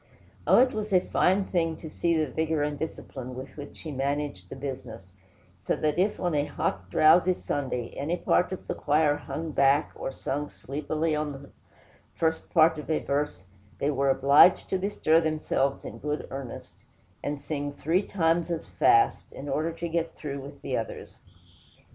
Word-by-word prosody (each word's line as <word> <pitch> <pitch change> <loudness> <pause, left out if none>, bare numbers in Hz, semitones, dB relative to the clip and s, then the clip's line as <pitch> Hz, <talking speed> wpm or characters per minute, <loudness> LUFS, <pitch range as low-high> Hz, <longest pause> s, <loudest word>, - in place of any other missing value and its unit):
Oh, - - +6
it 255 +1 +5
was 215 -1 -3
a 185 - +6
fine 190 +2 +2
thing 165 -4 0
to 160 - -9
see 170 +1 0
the 155 - +2
vigor 160 +1 0
and 145 -1 -2
discipline 130 -5 -6
with 130 +1 -8
which 145 -1 -9
he 160 - -6
managed 140 -8 -2
the - - -7
business; 125 -8 -7 0.5
so - - -1
that 155 +2 0
if, 200 +3 +1
on 175 -2 0
a 145 -1 +1
hot, 90 -9 -3
drowsy 175 - +5
Sunday, 130 -7 -3
any 155 +6 -1
part 180 - +2
of 185 - -6
the - - -1
choir 150 0 +2
hung 155 +2 -5
back 140 +1 +3
or - - -5
sung 145 +2 -3
sleepily 155 +3 -2
on 150 -1 -2
the 135 0 -11 0.7
first 160 0 -1
part 160 -1 +4
of 150 - -9
a 155 - +2
verse, 145 -5 -2 0.3
they 145 - 0
were 140 0 +1
obliged 140 +6 +6
to 190 - 0
bestir 175 -4 +2
themselves 155 -3 0
in - - -7
good 150 +1 -3
earnest, 135 -3 -7 0.5
and 145 0 -2
sing 145 0 -3
three 165 +6 +1
times 170 -4 +1
as 170 -2 -3
fast, 115 - +3
in 140 - -8
order 155 +3 0
to 170 +1 -5
get 165 0 -2
through 140 -2 -5
with 140 +1 -11
the 130 - -2
others. 115 - -5
150 Hz, 180 wpm, -27 LUFS, 140-165 Hz, 0.7 s, Oh